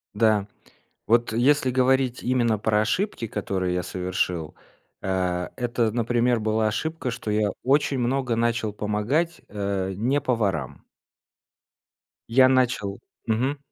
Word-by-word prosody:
Да. 105 -2 +3 0.6
Вот, 115 0 +3
э, 115 - -1
если 135 +1 +3
говорить 130 0 +2
именно 120 -3 +1
про 105 +1 +2
ошибки, 115 - -1
которые 95 -4 -2
я 90 - 0
совершил, 90 -3 -2 0.5
а, 90 -2 -1
это, 120 -3 0
например, 120 0 +1
была 110 0 +1
ошибка, 155 +4 -3
что 115 -2 -5
я 105 -1 +1
очень 140 0 +2
много 125 0 0
начал 115 -2 0
помогать, 105 +12 -1
э, 100 -2 -2
не 125 +9 +1
поварам. 100 - -1 1.5
Я 130 +2 +6
начал 120 -6 +1 0.3
мгм. 125 +6 0
115 Hz, 125 wpm, -24 LUFS, 105-130 Hz, 1.5 s, Я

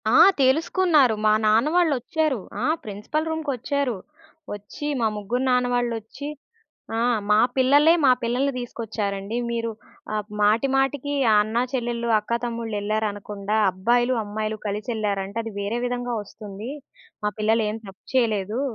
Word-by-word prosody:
ఆ! - - +5 0.2
తెలుసుకున్నారు. 300 - +3
మా 215 - +6
నాన్న 220 +7 +4
వాళ్ళొచ్చారు. 310 -4 +1 0.2
ఆ! - - -1 0.2
ప్రిన్సిపల్ 215 +10 -3
రూమ్‌కొచ్చారు. 280 -5 -2 0.6
ఒచ్చి, 205 +8 -7
మా 225 - +3
ముగ్గురు 230 +5 -2
నాన్న 250 0 +3
వాళ్ళొచ్చి, 240 +3 -3 0.7
ఆహ్, 235 0 +2
"మా 210 - +6 0.2
పిల్లలే, 285 +5 +5
మా 260 - +7
పిల్లల్ని 250 +4 0
తీసుకొచ్చారండి. 215 -3 -4
మీరు 230 -1 -1 0.4
ఆహ్ 210 -1 -2 0.2
మాటి 220 +6 +3
మాటికి, 280 +1 0 0.3
అన్నా 220 +3 0
చెల్లెల్లు, 240 -2 -2
అక్కా 235 +3 -1
తమ్ముళ్ళు, 230 -2 -3
ఎళ్లారనకుండా, 210 -1 -2 0.2
అబ్బాయిలు, 240 +6 +2
అమ్మాయిలు 215 +1 -3
కలిసెళ్లారంటే, 210 -1 -2
అది 225 - -6
వేరే 205 +4 -2
విధంగా 245 0 -2
ఒస్తుంది. 210 +3 -8 0.5
మా 210 - +2
పిల్లలేం 220 0 +1
తప్పు 195 0 -14
చేయలేదూ" 220 -2 +1
230 Hz, 125 wpm, -24 LUFS, 210-255 Hz, 0.7 s, మా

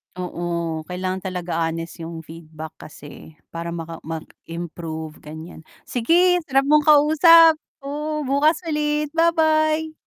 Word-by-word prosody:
Oo, 170 -3 -4
kailangan 185 +1 -4
talaga 175 -3 -2
honest 165 +1 -5
'yong 165 -1 -7
feedback 160 -1 -11
kasi, 150 +1 -13 0.2
para 170 0 -6
maka 165 -1 -7
mag 160 0 -5 0.2
improve 165 -2 -7
ganyan, 160 +1 -11 0.2
sige, 345 +9 +3
sarap 275 -1 +1
mong 300 0 +4
kausap, 315 +2 +6 0.2
oo, 300 +2 -4
bukas 290 +4 +1
ulit, 300 -1 -1
ba-bye. 315 -1 +2
185 Hz, 120 wpm, -22 LUFS, -, 0.2 s, kausap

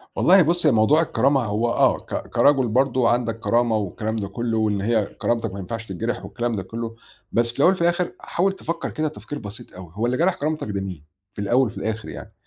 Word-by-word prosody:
والله 190 +2 +6
بُص 170 +1 +1
هي 150 - +6
موضوع 120 +8 +4
الكرامة 135 -2 +2
هو 105 +3 0
آه - - +3
ك - - -6
كرجل 135 -3 +3
برضه 125 +1 +2
عندَك 115 -2 0
كرامة 115 -1 +2
والكلام 105 +2 -3
ده 105 -3 -3
كُلّه، 115 +3 -2
وإن 105 -2 +1
هي 110 0 +1
كرامتَك 115 -2 -2
ما 100 - -6
ينفعش 110 +4 -5
تتجرح 105 +3 -3
والكلام 120 +5 -2
ده 100 -3 -3
كُلّه، 115 +4 -6 0.4
بس 115 0 +1
في 120 - -18
الأول 175 - +6
وفي 185 - -6
الآخر 175 +1 +1
حاول 190 +3 0
تفكّر 170 -3 -4
كده 155 -1 -2
تفكير 145 -1 -7
بسيط 110 +2 -10
أوي 90 -3 -10
هو 110 +3 -1
اللي 125 +1 0
جرح 180 +3 +3
كرامتَك 155 -3 -2
ده 100 -1 -2
مين؟ 90 -6 -6 0.3
في 100 - -6
الأول 120 +6 +3
وفي 105 - -9
الآخر 110 +1 -3
يعني، - - -9
115 Hz, 220 wpm, -23 LUFS, 105-140 Hz, 0.4 s, والله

